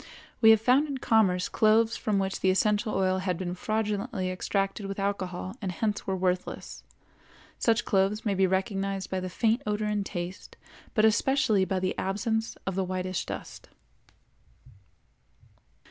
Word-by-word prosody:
We 220 - +8
have 220 -1 +7
found 255 +7 +3
in 280 -2 -3
commerce 200 -7 +2
cloves 225 +1 +3
from 210 -2 -1
which 195 0 -1
the 190 - +2
essential 210 +3 +1
oil 190 -1 +1
had 185 -2 -1
been 180 -1 -3
fraudulently 210 0 -2
extracted 195 +2 -2
with 195 - -5
alcohol 190 -1 -3
and 190 -3 -2
hence 210 +3 -2
were 190 - 0
worthless; 180 -1 -3 0.8
such 225 -1 +2
cloves 195 +3 +1
may 205 - +1
be 190 0 +3
recognized 195 0 -2
by 190 - 0
the 185 0 -4
faint 225 +6 +1
odor 210 0 0
and 210 -1 0
taste, 180 -1 -6 0.4
but 215 - +4
especially 220 -3 +3
by 190 0 -1
the 185 0 -1
absence 220 +4 -1
of 190 - -2
the 190 +1 0
whitish 185 0 -3
dust. - - -8
195 Hz, 155 wpm, -28 LUFS, 185-220 Hz, 0.8 s, We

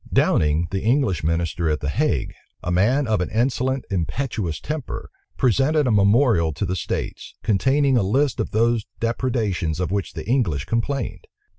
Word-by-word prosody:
Downing, 75 +2 +2
the 95 - -1
English 115 - +1
minister 85 0 0
at 75 - 0
the 70 - -3
Hague, 95 - 0 0.3
a 90 - -2
man 120 +11 +3
of 110 -5 +1
an 90 - -2
insolent, 130 +3 0
impetuous 95 - -2
temper, 150 -4 -5 0.3
presented 140 +4 +2
a 125 - +2
memorial 100 - +4
to 100 - -2
the 95 0 -2
states, - - -4
containing 135 +5 +2
a - - +3
list 130 +7 +1
of - - -1
those 115 0 +2 0.2
depredations 115 - -1
of 90 0 -1
which 100 -1 -2
the - - -7
English 105 - +1
complained. 120 +2 -2
110 Hz, 160 wpm, -22 LUFS, 90-130 Hz, 0.3 s, memorial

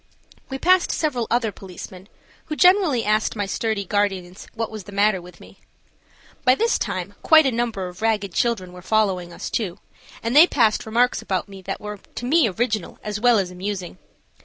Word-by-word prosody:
We 265 - -4
passed 365 +4 +3
several 255 -7 -1
other 235 -2 +1
policemen, 190 0 -11 0.4
who 305 - -4
generally 360 - +4
asked 215 +2 +1
my 205 -2 -1
sturdy 200 0 -2
guardians 190 -2 -2
what 225 -1 -3
was 215 -3 -8
the 205 - -10
matter 200 -1 +2
with 180 +1 -14
me. - - -16 0.8
By 255 -1 +5
this 465 +9 +1
time 185 +2 -3
quite 315 -1 +6
a 265 - +2
number 230 -5 -2
of 180 +3 -11
ragged 210 -4 0
children 190 -6 -1
were 180 - -11
following 190 -4 0
us - - -7
too, 195 -7 -2 0.5
and 230 +3 -1
they 320 +4 +9
passed 225 -8 +2
remarks 240 +3 +2
about 190 0 -2
me 195 -1 -11
that - - -5
were 210 -1 -7 0.2
to 245 - -5
me 280 -2 +4
original 215 -1 -2
as 210 0 -4
well 240 0 +4
as 190 -3 -1
amusing. 185 0 -5
215 Hz, 185 wpm, -22 LUFS, 190-240 Hz, 0.8 s, they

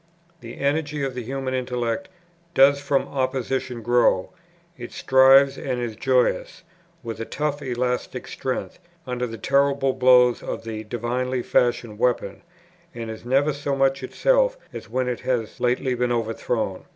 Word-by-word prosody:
The 115 -3 -10
energy 145 0 -1
of 135 -1 -2
the 125 - -4
human 130 +2 -4
intellect 125 +7 -2 0.5
"does 140 +1 +5
from 140 -1 0
opposition 130 -2 -2
grow;" 120 -5 +2 0.4
it 120 -1 -9
thrives 135 +1 +5
and 130 -2 -3
is 120 -3 -4
joyous, 125 +2 0 0.4
with 115 -1 -6
a 115 - -3
tough 150 +2 -2
elastic 125 -1 -2
strength, - - -4 0.3
under 125 -1 -2
the 115 -1 -7
terrible 140 +3 +2
blows 125 -1 +5
of - - -5
the 110 -1 -5
divinely 120 +3 -2
fashioned 120 -3 0
weapon, 120 -5 0 0.5
and 115 -1 -5
is 110 +1 -10
never 140 +4 +2
so 140 0 -2
much 135 0 +2
itself - - +2 0.2
as - - -8
when 130 +2 -1
it 125 -1 -2
has 125 -4 -2
lately 125 +1 +1
been 125 0 0
overthrown. 115 -3 -2
125 Hz, 150 wpm, -23 LUFS, 120-135 Hz, 0.5 s, does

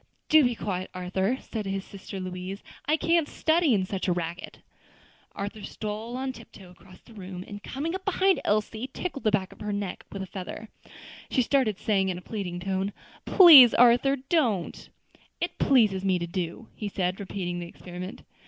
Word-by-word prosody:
"Do 310 -1 +7
be 245 -2 +1
quiet, 185 -4 -4
Arthur," 190 +6 -1
said 215 -3 -5
his 195 0 -3
sister 195 0 -8
Louise; 185 +2 -6 0.2
"I 305 +2 +3
can't 330 -1 +2
study 320 -6 +2
in 190 -2 0
such 190 0 -3
a - - +2
racket." 175 +1 -4 0.8
Arthur 205 +1 -5
stole 215 +4 -5
on 260 0 -3
tiptoe 200 -6 -14
across 185 +1 -17
the 230 - -17
room, 185 -3 -8
and 205 -1 -8
coming 290 - -4
up 380 0 -4
behind 385 -4 +2
Elsie, 215 +4 -1
tickled 310 -2 -5
the 215 - +3
back 195 -3 0
of - - -22
her 210 0 -4
neck 200 -2 -4
with 195 -1 -5
a - - -5
feather. 195 +3 -8 0.6
She 255 - +2
started, 235 -6 +1
saying 195 -3 +1
in 180 - -2
a - - -8
pleading 180 -4 -5
tone, 190 +2 -2 0.3
"Please, 300 - +9
Arthur, 245 +3 +5
don't." 255 - -1 0.5
"It - - -3
pleases 215 -8 +3
me 190 -2 +2
to 170 - -3
do," 175 +4 -5
he 210 - -5
said, 185 -1 -2
repeating 180 -3 -4
the 175 - -6
experiment. 180 +2 -9
205 Hz, 180 wpm, -27 LUFS, 185-250 Hz, 0.8 s, Please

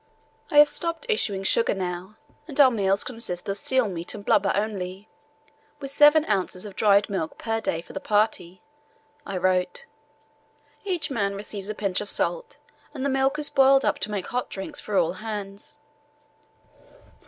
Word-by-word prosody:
"I 300 - 0
have 295 0 +9
stopped 335 +7 -3
issuing 205 - 0
sugar 230 +2 +2
now, 185 +2 -5 0.3
and 295 -3 -6
our 270 -3 +8
meals 200 -3 +1
consist 225 -8 -3
of 195 - -1
seal 260 -3 +1
meat 175 -3 -4
and 205 - -9
blubber 195 -1 +3
only, 200 -1 -4 0.7
with 275 -1 -6
7 295 +2 +6
ozs. 190 -2 -1
of 200 -2 -9
dried 200 0 +4
milk 185 -6 -4
per 225 0 -2
day 165 -6 -1
for - - -14
the - - -4
party," 205 -4 0 0.6
I 195 - -3
wrote. 185 - 0 1.0
"Each 345 -7 -2
man 200 -5 -1
receives 200 0 -6
a 215 - -3
pinch 200 -3 -1
of 205 - -5
salt, - - -1 0.4
and 270 -1 -3
the - - +1
milk 270 +2 +1
is 300 -1 -2
boiled 270 0 +5
up - - +1
to 210 - -2
make 205 -3 -3
hot 250 +1 -3
drinks 195 -1 -4
for 205 -2 -2
all 170 -1 +2
hands. 205 +2 -7
210 Hz, 170 wpm, -25 LUFS, 190-270 Hz, 1.0 s, have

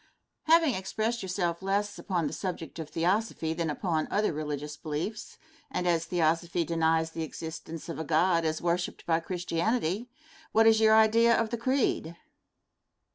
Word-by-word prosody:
Question. 330 +1 +7
Having 280 -6 +1
expressed 220 +5 -2
yourself 180 -2 -2
less 200 +2 -1
upon 180 -5 -1
the - - -3
subject 170 -4 -5
of 160 -2 -6
Theosophy 175 -1 0
than 165 -1 -2
upon 160 0 -1
other 210 -3 +1
religious 150 -1 -4
beliefs, 160 +9 -5 0.3
and 180 - -2
as 170 -1 +2
Theosophy 170 0 +1
denies 160 0 +1
the 165 - -5
existence 160 +1 -7
of 165 -3 -5
a - - -2
God 165 +2 +2
as 155 0 -2
worshiped 175 +1 -1
by 165 -1 +2
Christianity, 180 +5 -1 0.4
what 225 +1 +5
is 225 -1 +6
your 220 0 +6
idea 230 +2 +5
of 225 -1 -1
the 235 - -1
creed? 235 - 0
175 Hz, 160 wpm, -29 LUFS, 160-215 Hz, 0.4 s, Question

